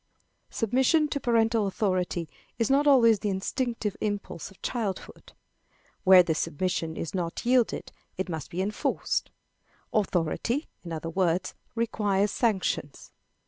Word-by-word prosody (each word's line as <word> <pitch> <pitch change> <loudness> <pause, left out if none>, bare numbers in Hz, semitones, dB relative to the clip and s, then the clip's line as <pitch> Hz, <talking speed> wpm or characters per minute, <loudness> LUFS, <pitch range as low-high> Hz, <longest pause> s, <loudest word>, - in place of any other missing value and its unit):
Submission 265 +7 +2
to 285 - -1
parental 225 -3 +2
authority 185 -4 -1 0.3
is 230 +2 +1
not 285 +2 +4
always 230 -6 +6
the 210 - -1
instinctive 210 +2 -2
impulse 205 -6 -3
of 195 - -19
childhood. 215 -6 -4 0.7
Where 185 -1 +8
this 165 -2 -1
submission 165 0 -2
is 165 - -4
not 175 0 -3
yielded, 245 -1 +2 0.3
it 190 - -2
must 160 -4 -5
be 185 +2 -2
enforced. 205 +2 -1 0.6
Authority, 210 - 0 0.2
in 170 - -8
other 165 0 -4
words, 180 0 0 0.2
requires 210 -3 +1
sanctions. 190 - -1
200 Hz, 125 wpm, -27 LUFS, 180-230 Hz, 0.7 s, Where